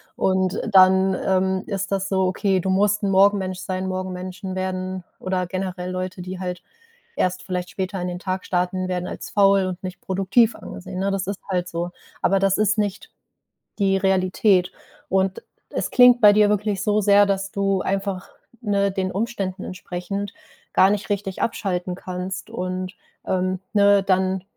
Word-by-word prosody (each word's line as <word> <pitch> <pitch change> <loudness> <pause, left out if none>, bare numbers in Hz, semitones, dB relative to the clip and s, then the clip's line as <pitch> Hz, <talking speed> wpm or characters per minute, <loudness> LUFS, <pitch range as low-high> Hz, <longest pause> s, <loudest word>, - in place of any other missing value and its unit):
Und 185 +1 +1
dann, 190 0 +6
ähm, 190 0 +1
ist 195 -1 -3
das 195 -1 0
so, 190 -1 +1
okay, 190 0 +1
du 190 - -2
musst 205 +2 +2
'n 200 - +1
Morgenmensch 190 -1 +3
sein. 185 0 -3
Morgenmenschen 185 +1 -5
werden 185 0 -3 0.2
oder 185 -1 -2
generell 185 -1 -4
Leute, 185 0 -4
die 185 +1 -6
halt 180 -1 -4 0.5
erst 185 0 0
vielleicht 180 -1 -3
später 190 0 -3
in 180 - -2
den 180 0 -4
Tag 185 0 -3
starten, 185 +1 -1
werden 180 -1 -2
als - - -7
faul 195 -1 +4
und 185 -1 -4
nicht 185 -1 -6
produktiv 195 +5 +2
angesehen. 185 0 -8
Ne, 195 +1 0
das 195 -1 -1
ist 200 0 -3
halt 180 -1 -1
so. 170 0 -3 0.3
Aber 195 - +3
das 195 0 +2
ist 215 +1 +2
nicht 205 -2 -2 0.7
die 195 -1 +3
Realität. 190 0 +2 0.4
Und 190 0 +1 0.3
es - - -2
klingt 245 -1 +7
bei 210 -1 +8
dir 210 0 +5
wirklich 205 -1 0
so 210 0 +2
sehr, 205 0 +6
dass 195 -1 -1
du 195 -1 0
einfach, 195 -1 -2 0.3
ne, 200 -2 +1
den 190 -1 -2
Umständen 195 -3 -3
entsprechend 185 +2 -5 0.4
gar 190 - +6
nicht 210 0 -2
richtig 195 -2 -3
abschalten 180 -5 -2
kannst 185 +1 -6
und, 185 +1 -4 0.3
ähm, 185 0 0
ne, 200 -1 +5
dann 190 -1 +1
190 Hz, 165 wpm, -23 LUFS, 185-200 Hz, 0.7 s, bei